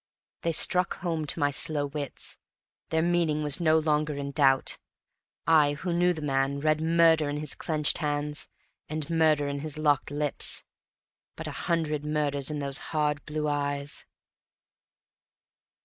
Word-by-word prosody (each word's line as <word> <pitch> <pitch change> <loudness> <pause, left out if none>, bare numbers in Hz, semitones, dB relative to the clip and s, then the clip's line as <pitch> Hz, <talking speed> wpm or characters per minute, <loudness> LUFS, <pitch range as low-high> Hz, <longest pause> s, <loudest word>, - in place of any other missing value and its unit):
They 170 - 0
struck 180 +3 +2
home 165 -4 -2
to - - -1
my 145 0 +2
slow 145 0 +1
wits; 145 -1 -5 0.5
their 160 0 +1
meaning 170 -3 +1
was 145 +2 +2
no 160 -2 +4
longer 150 -1 0
in 140 0 -4
doubt. 135 -2 +2 0.7
I, 150 -2 +4
who 170 +4 -3
knew 175 +1 +3
the 160 -3 -5
man, 135 0 0
read 155 +1 +1
murder 165 -2 +4
in 145 - -3
his 150 -1 -3
clenched 155 -3 0
hands, 150 -1 -2 0.4
and 155 -1 -3
murder 155 -3 +3
in 140 0 -3
his 155 0 -5
locked 150 -2 +1
lips, 145 0 +1 0.7
but - - -7
a - - -3
hundred 155 -3 -1
murders 150 -2 -1
in 150 - -3
those 140 -1 -1
hard 150 -2 0
blue 150 0 -2
eyes. 145 -1 -2
150 Hz, 150 wpm, -27 LUFS, 145-160 Hz, 0.7 s, no